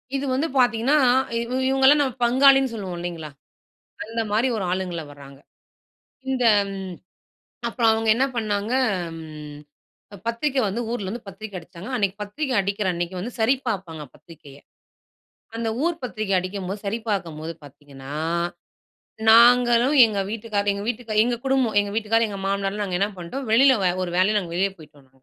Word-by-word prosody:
இது 275 - -2
வந்து 280 +5 0
பார்த்தீங்கன்னா, 245 +4 +3 0.7
இவங்கள்லாம் 270 +2 +5
நம்ம 260 -3 -1
பங்காளின்னு 270 +1 +5
சொல்வோம் 190 -5 -5
இல்லிங்களா? 170 -3 -6 0.8
அந்த 225 +1 -4
மாரி 225 +5 +2
ஒரு 195 - -2
ஆளுங்கள 180 -3 -3
வராங்க. 140 -1 -14 0.9
இந்த 255 -2 0 1.3
அப்புறம் 230 -2 +2
அவங்க 225 0 -1
என்ன 265 +3 +2
பண்ணாங்க, 210 0 -1 1.5
பத்திரிக்கை 260 +4 0
வந்து 215 +5 -3
ஊர்ல 210 -5 -3
இருந்து 225 +2 -7
பத்திரிக்க 195 0 -8
அடிச்சாங்க, 170 +4 -11
அன்னைக்கு 200 -4 0
பத்திரிக்க 260 +7 -4
அடிக்கிற 200 +1 -2
அன்னிக்கு 175 +1 -4
வந்து 235 +5 -5
சரி 240 +5 +4
பார்ப்பாங்க, 175 -7 -4
பத்திரிகைய. 145 -4 -15 1.0
அந்த 230 -1 -2 0.2
ஊர் 340 -1 -1
பத்திரிக 215 -4 -3
அடிக்கும்போது 190 +2 -4
சரி 220 +4 -1
பார்க்கும்போது 165 -5 -3
பார்த்தீங்கன்னா, 140 -1 -12 1.2
நாங்களும் 240 +3 +6
எங்க 210 -2 -3
வீட்டுக்காரர் 210 -2 -1
எங்க 200 0 -5
வீட்டுக்கார், 220 -3 -1
எங்க 240 0 0
குடும்பம், 265 -5 +1
எங்க 205 0 -3
வீட்டுக்காரர், 225 +1 +2
எங்க 200 -1 -6
மாமனார்லாம் 200 +1 -1
நாங்க 180 -2 -2
என்ன 200 - +2
பண்டோம், 250 +11 -6
வெளியில 260 +2 +6 0.3
ஒரு 175 - -5
வேலையா 210 +3 +3
நாங்க 175 -4 -5
வெளியே 195 +2 +1
போய்ட்டோம். 150 -3 -17
210 Hz, 140 wpm, -23 LUFS, 185-240 Hz, 1.5 s, நாங்களும்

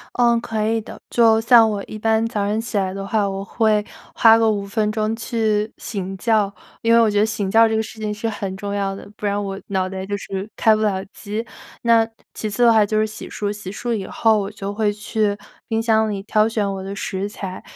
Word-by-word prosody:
呃， 235 -1 +4
可 220 -2 -2
以 225 +1 +1
的， 220 - -11
就 225 -2 +4
像 225 0 +6
我 200 -1 -3
一 215 - -8
般 220 +1 +1
早 210 -3 -2
上 215 +2 0
起 225 -2 -5
来 190 -1 0
的 195 0 -5
话， 205 -1 +1
我 195 0 -4
会 215 -1 +1 0.3
花 225 -1 +6
个 225 -1 +3
5 200 -2 -2
分 210 +1 0
钟 215 0 -1
去 220 -2 -1
醒 195 -3 -5
觉。 215 -2 +2 0.3
因 230 0 +3
为 230 - +7
我 225 - +4
觉 205 -1 +2
得 - - +5
醒 210 -3 -2
觉 225 +2 +5
这 220 - 0
个 220 - +1
事 220 0 -10
情 210 -1 -2
是 220 +2 -3
很 195 -3 -4
重 200 0 -4
要 195 -1 -1
的， - - -11
不 - - -11
然 205 0 0
我 195 0 -5
脑 190 -1 0
袋 190 0 -5
就 205 +1 -3
是 195 +1 -6
开 220 -1 +5
不 215 - -1
了 195 -2 0
机。 215 +2 -5 0.4
那， 230 -1 +5 0.3
其 215 - -4
次 240 +4 +1
的 235 - +7
话 220 -2 +5
就 215 +1 0
是 215 - +2
洗 215 - -9
漱， 205 -1 -3
洗 205 -3 -7
漱 240 +3 -3
以 200 -4 -3
后 220 -2 +2
我 195 - -4
就 200 -1 -6
会 210 -1 +1
去 210 0 -1 0.3
冰 225 -1 0
箱 220 -1 +2
里 195 -1 -4
挑 215 0 +2
选 210 -3 -1
我 190 - -5
的 195 +1 -6
食 195 0 -3
材。 190 -2 -7
215 Hz, 260 characters per minute, -21 LUFS, 200-225 Hz, 0.4 s, 为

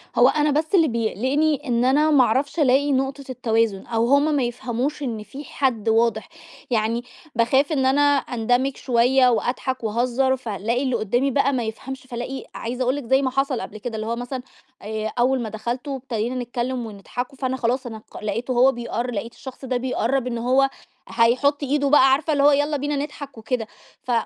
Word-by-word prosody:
هو 245 - +6
أنا 300 +1 +2
بس 310 +6 +1
اللي 330 -4 +5
بيقلقني 260 +7 0
إن 240 0 +1
أنا 300 +4 +3
ما 270 -4 +6
أعرفش 275 +8 0
ألاقي 280 +1 +3
نقطة 270 +1 -1
التوازن، 225 -5 0
أو 230 0 0
هُم 290 +3 +3
ما 270 - +1
يفهموش 245 +4 -3
إن 225 -5 -3
في 280 +6 -9
حد 240 -6 -1
واضح. 225 -1 +1 0.4
يعني 230 +1 0 0.3
باخاف 265 +6 +2
إن 265 -3 +1
أنا 270 +2 +3 0.2
أندمج 245 +1 0
شوية 250 +1 +3
وأضحك 250 +1 -1
وأهزر، 250 +4 +1
فالاقي 230 +2 -2
اللي 255 -2 0
قُدامي 245 +5 0
بَقى 275 +1 +2
ما 250 -2 0
يفهمش، 255 +4 -6
فالاقي 255 +1 -6
عايزة 245 +2 -3
أقول 255 +3 +1
لِك 290 - -5
زي 265 +3 +3
ما 260 -2 0
حصل 270 -2 0
قبل 215 - -7
كده، 225 +1 -5
اللي 220 0 -4
هو 230 - -1
مثلًا 245 +2 -5 0.4
آآ، 215 +1 -4
أول 255 +1 +2
ما 225 - -4
دخلت 240 +6 -4
وابتدينا 250 -3 -3
نتكلم 245 0 -3
ونضحكوا، 245 +5 -6
فأنا 260 -1 -2
خلاص 250 +2 0
أنا 220 -2 -6
ق - - -10
لقيته 225 +5 -2
هو 255 +2 +5
بيقر 240 +1 -3
لقيت 230 +2 -4
الشخص 265 0 -10
ده 255 -1 0
بيقرّب 255 +1 -1
إن 235 -1 -2
هو 260 +3 +3 0.4
هيحط 260 +5 +2
إيده 280 +1 +1
بقى، 270 -2 +6
عارفة 300 +3 +2
اللي 280 -1 +2
هو 290 - +7
يالّا 290 +1 +1
بينا 290 +1 -2
نضحك 285 -2 -6
وكده. 225 0 -3 0.4
ف 250 - -4
255 Hz, 190 wpm, -23 LUFS, 235-275 Hz, 0.4 s, هو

